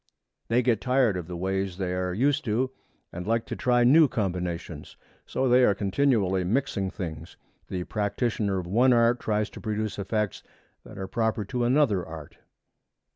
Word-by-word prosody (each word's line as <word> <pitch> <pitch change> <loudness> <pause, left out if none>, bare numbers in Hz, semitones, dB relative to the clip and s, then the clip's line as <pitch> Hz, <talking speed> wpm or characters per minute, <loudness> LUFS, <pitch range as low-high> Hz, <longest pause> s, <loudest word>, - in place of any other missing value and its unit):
They 120 +2 +2
get 115 -3 +1
tired 125 -5 +2
of 90 -3 -5
the 90 -1 -6
ways 95 0 -2
they 90 -2 -2
are 90 0 -1
used 140 +9 +1
to 125 +4 0 0.4
and 90 +2 -6
like 115 0 +1
to - - -5
try 120 -1 +2
new 150 +6 +6
combinations. 90 - -4 0.3
So 130 - 0
they 125 +1 +5
are 105 -5 +4
continually 100 -2 +1
mixing 100 -1 -1
things. 85 -4 -7 0.3
The 90 -1 -3
practitioner 105 0 -1
of 90 - -3
one 120 +8 +4
art 120 +1 +3
tries 105 0 -1
to - - -10
produce 110 -2 -3
effects 105 0 -2 0.4
that - - -12
are 95 - -4
proper 110 +1 -1
to 120 +4 -1
another 120 -8 +2
art. 80 -3 -10
105 Hz, 170 wpm, -26 LUFS, 95-120 Hz, 0.4 s, new